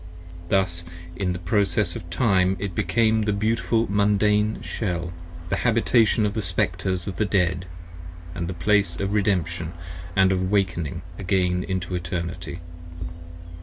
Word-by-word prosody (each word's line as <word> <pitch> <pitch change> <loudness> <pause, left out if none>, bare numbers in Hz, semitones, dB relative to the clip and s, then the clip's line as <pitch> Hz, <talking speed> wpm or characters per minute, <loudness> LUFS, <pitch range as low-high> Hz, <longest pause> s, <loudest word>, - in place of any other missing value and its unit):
Thus 90 -3 +1 0.3
in 90 -2 -1
process 90 -1 +1
of 85 - -7
time 95 -1 +3
it 100 -1 -4
became 110 +4 +2
the 105 0 +1
beautiful 110 +2 +1
Mundane 105 +1 +2
Shell, 85 -5 -3 0.4
The - - 0
Habitation 115 -1 +3
of 100 - 0
the 110 - -1
Speclres 90 0 -1
of 95 -3 -4
the 105 - +2
Dead 90 -2 +1 0.3
& 85 0 -13
the 85 +1 -3
Place 90 0 +1
Of 100 +1 -1
Redemption 85 -5 0 0.2
& 85 +1 -12
of 95 0 +5
awaking 90 -3 0 0.2
again 90 -2 +1
into 95 -1 -3
Eternity. 85 0 -4
95 Hz, 130 wpm, -24 LUFS, 85-105 Hz, 0.4 s, of